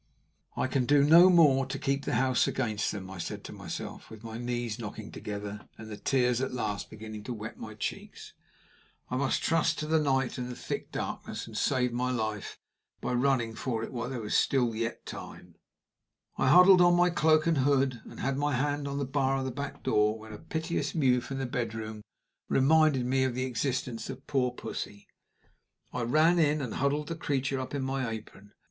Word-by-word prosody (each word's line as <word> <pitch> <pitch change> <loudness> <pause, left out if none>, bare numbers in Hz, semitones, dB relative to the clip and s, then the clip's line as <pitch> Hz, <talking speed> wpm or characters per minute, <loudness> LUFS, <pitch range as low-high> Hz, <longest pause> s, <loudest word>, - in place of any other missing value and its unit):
"I - - +1
can 130 -1 0
do 145 -1 +5
no 170 +5 +8
more 145 -7 +5
to 135 +1 -4
keep 140 +1 -1
the - - 0
house 130 +1 +2
against 105 -2 -1
them," 95 -3 -6
I 95 - -8
said - - -5
to - - -8
myself, - - -7
with 110 0 -12
my 115 0 -6
knees 120 -2 -3
knocking 105 -1 -7
together, 105 0 -6
and 110 0 -9
the - - -4
tears 125 +1 +1
at 130 - -1
last 105 -4 -3
beginning 110 -1 -8
to 125 - -3
wet 110 +1 -8
my 110 -1 -8
cheeks. 105 - -6 0.8
"I - - 0
must 135 0 0
trust 165 0 +2
to 155 - -3
the 160 +1 +2
night 135 -4 0
and 125 0 -4
the 125 - -6
thick - - -5
darkness, - - -4
and - - -11
save 125 -2 +1
my 125 +1 0
life 110 -4 -3 0.4
by - - -2
running 120 -3 +1
for 115 -1 -3
it - - -6
while 120 0 -3
there 120 -5 -4
is 105 - +3
yet 115 -3 0
time." - - -9 0.8
I - - +1
huddled 180 +5 +8
on 175 0 +6
my 175 0 +4
cloak 155 -2 +3
and 165 -4 +2
hood, 135 -3 +2
and - - -10
had 135 +1 0
my 145 -1 +1
hand 145 +2 -1
on 140 0 -3
the 140 - -1
bar 135 0 +1
of 135 - -2
the 130 - -2
back 140 +3 -6
door, 105 +1 +2
when 110 0 -11
a 105 - -8
piteous 165 +2 -3
mew 130 -5 +3
from 135 +3 -6
the 135 - -2
bedroom 110 -3 -4 0.5
reminded 145 -1 +4
me 130 +1 +2
of 130 -2 -1
the 130 +1 -1
existence 125 -2 -2
of 135 0 -8
poor 130 -3 +1
Pussy. 110 -4 -7 0.9
I 125 - -2
ran 155 +8 +4
in, 150 -1 +3
and 130 -5 -4
huddled 145 +2 0
the 165 - -2
creature 140 -4 -1
up 130 +2 -5
in 140 - -2
my 130 -2 -1
apron. 105 -2 -9
130 Hz, 205 wpm, -29 LUFS, 115-140 Hz, 0.9 s, no